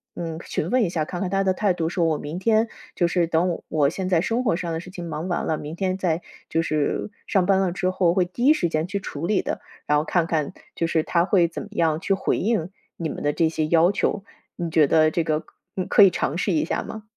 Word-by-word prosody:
嗯， 165 -2 -4
询 160 - -2
问 255 0 +3
一 190 - +1
下， 155 -4 -1
看 175 - -5
看 185 -1 -2
他 195 0 +2
的 190 -1 +1
态 200 -2 +2
度 165 -2 -1
说 170 -1 0
我 155 -2 +1
明 150 +4 -5
天 220 +3 +2 0.3
就 175 - +2
是 170 0 +1
等 170 +1 0
我 145 -3 +2
现 185 +4 -4
在 175 -3 +3
生 230 +6 0
活 190 -8 +2
上 175 -1 -3
的 160 - -2
事 180 +2 -10
情 175 -2 -7
忙 155 +3 -4
完 180 - -1
了， 155 - 0
明 150 +2 -7
天 185 +1 -1
再 175 -3 0 0.3
就 165 - +1
是 155 +4 -1 0.2
上 185 -3 +1
班 195 -1 +4
了 190 -2 +1
之 185 +1 -1
后 185 -2 +2
会 185 -1 +2
第 210 +8 -3
一 295 - +7
时 175 - 0
间 155 0 0
去 200 +3 -3
处 155 -4 -5
理 205 +2 +2
的， - - -3 0.3
然 150 - +3
后 150 - 0
看 170 -1 +1
看 155 -4 -1 0.2
就 165 - 0
是 165 -1 +1
他 170 +2 +1
会 180 -3 +3
怎 165 - -6
么 210 - -12
样 165 -5 +1
去 195 - 0
回 195 - 0
应 205 -5 0 0.3
你 165 -2 -3
们 - - -6
的 145 - +1
这 165 0 +2
些 155 -1 -1
要 170 +3 +4
求。 205 0 -1 0.4
你 170 -1 -2
觉 155 -3 +5
得 155 +1 +4
这 170 - 0
个， 155 0 -1 0.3
嗯， 185 -2 -2
可 - - +5
以 195 - +9
尝 160 -4 -2
试 195 - 0
一 160 - +1
下 - - -1
吗？ 220 - -8
175 Hz, 290 characters per minute, -24 LUFS, 160-190 Hz, 0.4 s, 以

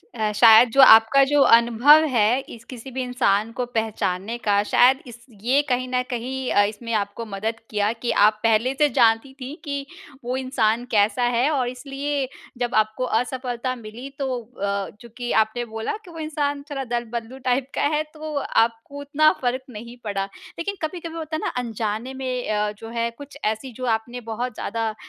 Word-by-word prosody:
अ, 215 -2 0
शायद 230 +2 +8
जो 275 - +5
आपका 225 +2 +8
जो 285 +1 +3 0.2
अनुभव 240 +7 +5
है, 230 +2 +3
इस 230 - -11
किसी 255 +1 -9
भी 260 +1 -3
इंसान 230 -4 +1
को 250 - 0
पहचानने 220 -2 -2
का, 205 -4 +2
शायद 255 +5 +4
इस 240 0 -12 0.2
ये 260 +6 +3
कहीं 255 0 0
न 250 0 +1
कहीं 255 +2 -3
अ, 205 - +5
इसमें 215 +3 -4
आपको 205 +2 -2
मदद 220 +2 -4
किया 210 0 +1
कि 235 +1 -3
आप 215 +1 +4
पहले 230 +3 +2
से 295 -1 +4
जानती 225 +3 +3
थीं 265 +4 -6
कि 280 -3 -4 0.4
वो 245 +2 -2
इंसान 240 -3 0
कैसा 210 +2 +2
है 240 +3 +2
और 260 -5 0
इसलिए 275 +2 -3 0.3
जब 240 0 -2
आपको 215 +3 +1 0.2
असफलता 255 0 -3
मिली, 235 +3 -9
तो 260 -3 -1 0.2
अ, 200 -1 -1
चूँकि 240 +1 -6
आपने 240 +3 -6
बोला 225 - -4
कि 350 - -12
वो 330 - -9
इंसान 290 -2 -2
थोड़ा 275 -1 -3
दल-बदलू 235 0 -4
टाइप 255 +1 +1
का - - 0
है, 305 - +1
तो 310 0 -8
आपको 235 0 0
उतना 305 +2 +3
फ़र्क़ 255 +1 -1
नहीं 235 +2 -9
पड़ा। 200 -2 -2 0.3
लेकिन 400 +4 -3
कभी-कभी 330 +1 -5
होता 320 -1 -4
है - - -2
ना, - - 0
अनजाने 225 +1 -4
में 255 -2 -4
अ, 210 0 0
जो 225 - -9
है, 235 0 -1
कुछ 285 +4 -12
ऐसी, 220 +4 -2
जो 255 +3 -6
आपने 240 +3 -7
बहुत 240 +3 -3
ज़्यादा 225 +1 -2
अ, 215 - -7
245 Hz, 185 wpm, -23 LUFS, 220-265 Hz, 0.4 s, शायद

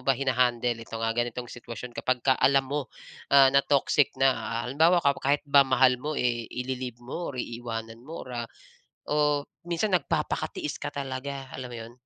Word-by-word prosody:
ba 135 0 +2
hina-handle 125 -2 +1
itong, 115 0 -4
ah, 115 - +1
ganitong 120 +1 -3
sitwasyon 120 0 -8
kapagka 130 +2 +1
alam 135 0 +4
mo 140 -1 -3 0.5
ah 135 -1 +8
na 140 +1 +5
toxic 140 0 +2
na. 135 0 +5
Ah 115 -2 -3
halimbawa 165 +5 +4
kapo 140 -2 +2
kahit 145 +2 +2
ba 140 -1 +6
mahal 130 -1 +4
mo, 150 +3 -3
eh, 120 -2 0
i-li-leave 125 -1 -4
mo 150 +8 -5
or - - -9
iiwanan 115 -2 -5
mo 160 +6 -8
or - - -10 0.2
ah, - - -32 0.6
o 150 -1 +2 0.2
minsan 175 +4 0
nagpapakatiis 175 -6 -1
ka - - -2
talaga, 135 0 -5
alam 125 -1 -6
mo - - -6
'yon? 115 +1 -9
130 Hz, 180 wpm, -27 LUFS, 120-140 Hz, 0.6 s, ah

